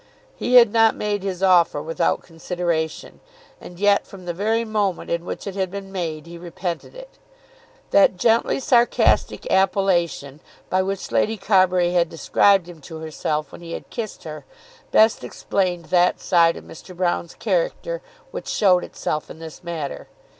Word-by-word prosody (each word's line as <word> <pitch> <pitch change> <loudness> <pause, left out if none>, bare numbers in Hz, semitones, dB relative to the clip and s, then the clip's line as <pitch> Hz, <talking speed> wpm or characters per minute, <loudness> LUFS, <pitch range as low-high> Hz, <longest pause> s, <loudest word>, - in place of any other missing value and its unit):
He 250 - 0
had 235 -3 +7
not 225 -1 +4
made 205 -1 -2
his 190 -1 -4
offer 175 -5 +4
without 160 +2 -1
consideration, 165 -1 -3 0.4
and 175 0 -11
yet 205 0 +3
from 190 -2 -12
the 175 - -3
very 220 +5 0
moment 210 -4 -2
in 170 0 -2
which - - -6
it 200 - -5
had 190 -1 -2
been 195 0 -8
made 165 -5 -4
he 170 0 -10
repented 175 - -6
it. - - -13 0.7
That 285 -10 +5
gently 230 +6 +2
sarcastic 240 -2 +2
appellation 175 -7 +1 0.3
by 185 - +3
which 195 0 -4
Lady 220 +1 +1
Carbury 185 -3 +3
had 175 -2 +2
described 180 +3 +3
him 170 -3 -12
to 160 +3 -9
herself 155 -1 -3
when - - -11
he 165 -1 -8
had - - -8
kissed 225 -4 -6
her 155 -1 -8 0.5
best 220 0 +4
explained 180 -3 -2
that 180 0 +3
side 170 -2 +3
of - - -10
Mr. 180 +3 -12
Broune's 175 -1 -1
character - - -2 0.3
which - - -7
showed 185 -3 +3
itself 155 - -4
in - - -10
this 160 +1 -10
matter. 165 -5 -5
180 Hz, 160 wpm, -22 LUFS, 170-205 Hz, 0.7 s, had